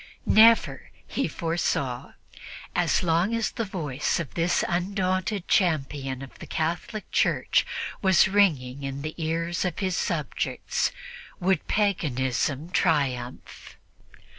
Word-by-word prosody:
Never, 225 Hz, +1 st, +5 dB, 0.2 s
he -, -, -2 dB
foresaw, 150 Hz, -7 st, -2 dB, 0.6 s
as -, -, +2 dB
long 175 Hz, +6 st, +2 dB
as 230 Hz, -1 st, 0 dB
the 230 Hz, -, -3 dB
voice 150 Hz, -, -2 dB
of 165 Hz, -6 st, -5 dB
this 170 Hz, +1 st, +1 dB
undaunted 185 Hz, +1 st, -1 dB
champion 135 Hz, -6 st, 0 dB
of 135 Hz, -, -12 dB
the -, -, -9 dB
Catholic 170 Hz, +7 st, -3 dB
Church -, -, +2 dB, 0.3 s
was 190 Hz, -3 st, +5 dB
ringing 150 Hz, -10 st, +2 dB
in 140 Hz, 0 st, -5 dB
the 155 Hz, +1 st, -4 dB
ears 165 Hz, +2 st, -1 dB
of 180 Hz, -3 st, -2 dB
his 190 Hz, -3 st, -1 dB
subjects, -, -, -1 dB, 0.5 s
would 185 Hz, -2 st, +1 dB
paganism 150 Hz, -, 0 dB
triumph. 135 Hz, -9 st, -1 dB
165 Hz, 115 wpm, -26 LUFS, 140-190 Hz, 0.6 s, Never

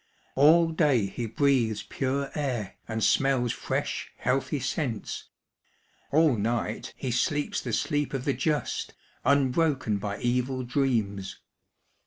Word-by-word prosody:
All 165 Hz, +4 st, +6 dB
day 145 Hz, -, +3 dB
he 115 Hz, +4 st, -4 dB
breathes 115 Hz, -3 st, +1 dB
pure 135 Hz, +1 st, -2 dB
air, 125 Hz, -9 st, -3 dB
and 110 Hz, -1 st, -2 dB
smells 130 Hz, -3 st, +3 dB
fresh, -, -, -3 dB
healthy 130 Hz, +3 st, 0 dB
scents; 130 Hz, -3 st, -3 dB, 0.9 s
all 155 Hz, -3 st, +4 dB
night 115 Hz, +2 st, -2 dB
he 130 Hz, -, -3 dB
sleeps 145 Hz, +4 st, 0 dB
the -, -, -4 dB
sleep 145 Hz, 0 st, 0 dB
of 130 Hz, 0 st, -3 dB
the 140 Hz, -, +2 dB
just, 150 Hz, +4 st, -1 dB, 0.3 s
unbroken 140 Hz, -4 st, +2 dB
by 100 Hz, 0 st, -3 dB
evil 125 Hz, +1 st, 0 dB
dreams. 115 Hz, -7 st, -1 dB
130 Hz, 120 wpm, -27 LUFS, 115-145 Hz, 0.9 s, All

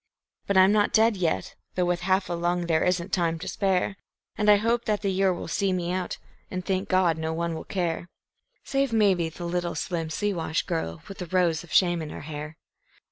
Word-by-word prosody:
But 200 Hz, -, +2 dB
I'm 190 Hz, +1 st, +7 dB
not 210 Hz, -1 st, +2 dB
dead 220 Hz, 0 st, +4 dB
yet; 175 Hz, -4 st, -1 dB, 0.2 s
though 180 Hz, -, +2 dB
with 175 Hz, 0 st, 0 dB
half 190 Hz, +2 st, +1 dB
a -, -, -2 dB
lung 175 Hz, +1 st, 0 dB
there 160 Hz, -2 st, +2 dB
isn't 180 Hz, +1 st, 0 dB
time 165 Hz, -3 st, +1 dB
to 165 Hz, -, -7 dB
spare, 195 Hz, 0 st, 0 dB, 0.4 s
And 210 Hz, 0 st, +2 dB
I 210 Hz, -, +9 dB
hope 230 Hz, +3 st, +1 dB
that 210 Hz, -1 st, 0 dB
the 200 Hz, -, +1 dB
year 190 Hz, 0 st, +2 dB
will 175 Hz, -, -4 dB
see 195 Hz, -1 st, 0 dB
me 175 Hz, -1 st, -1 dB
out, 185 Hz, -1 st, -2 dB, 0.3 s
and, 185 Hz, -1 st, -4 dB
thank 190 Hz, +1 st, -1 dB
God, 180 Hz, -4 st, +3 dB
no 160 Hz, 0 st, -2 dB
one 170 Hz, +1 st, -2 dB
will 160 Hz, -, -6 dB
care 175 Hz, -2 st, -2 dB, 0.5 s
Save 275 Hz, -2 st, 0 dB
maybe 195 Hz, -7 st, +3 dB
the 175 Hz, +2 st, -8 dB
little 175 Hz, 0 st, -2 dB
slim 165 Hz, -3 st, -2 dB
Siwash 165 Hz, -3 st, -1 dB
girl 160 Hz, -, -3 dB
with 195 Hz, -, -9 dB
the 180 Hz, -, -5 dB
rose 175 Hz, -2 st, +1 dB
of 175 Hz, -, -15 dB
shame 175 Hz, -3 st, +3 dB
in 155 Hz, -, -5 dB
her -, -, -7 dB
hair. 150 Hz, +1 st, -7 dB
180 Hz, 215 wpm, -26 LUFS, 170-195 Hz, 0.5 s, I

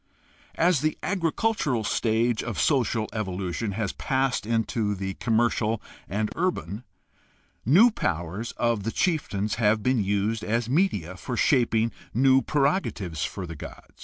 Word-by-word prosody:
As 170 Hz, -4 st, +3 dB
the 155 Hz, 0 st, 0 dB
agricultural 165 Hz, -, 0 dB
stage 115 Hz, +2 st, +1 dB
of 120 Hz, -4 st, -4 dB
social 120 Hz, -6 st, +1 dB
evolution 95 Hz, 0 st, -3 dB
has 105 Hz, -1 st, -2 dB
passed 130 Hz, -5 st, -1 dB
into 115 Hz, -2 st, 0 dB
the 95 Hz, 0 st, -4 dB
commercial 115 Hz, 0 st, +1 dB, 0.3 s
and 105 Hz, +3 st, -1 dB
urban, 125 Hz, -, -2 dB, 0.8 s
the -, -, -5 dB
new 210 Hz, -, +7 dB
powers 95 Hz, -, -3 dB
of 115 Hz, -3 st, 0 dB
the 115 Hz, +3 st, -2 dB
chieftains 110 Hz, -, -1 dB
have 110 Hz, -1 st, +3 dB
been 125 Hz, -3 st, +2 dB
used 105 Hz, +3 st, 0 dB
as 115 Hz, +1 st, 0 dB
media 125 Hz, -, 0 dB
for 120 Hz, +5 st, -5 dB
shaping 115 Hz, -4 st, +2 dB, 0.2 s
new 135 Hz, +2 st, +5 dB
preroga 150 Hz, +7 st, +1 dB
tives 85 Hz, -7 st, -5 dB
for 95 Hz, -, -4 dB
the 85 Hz, -1 st, -7 dB
god. 70 Hz, -, -11 dB
115 Hz, 140 wpm, -26 LUFS, 105-135 Hz, 0.8 s, new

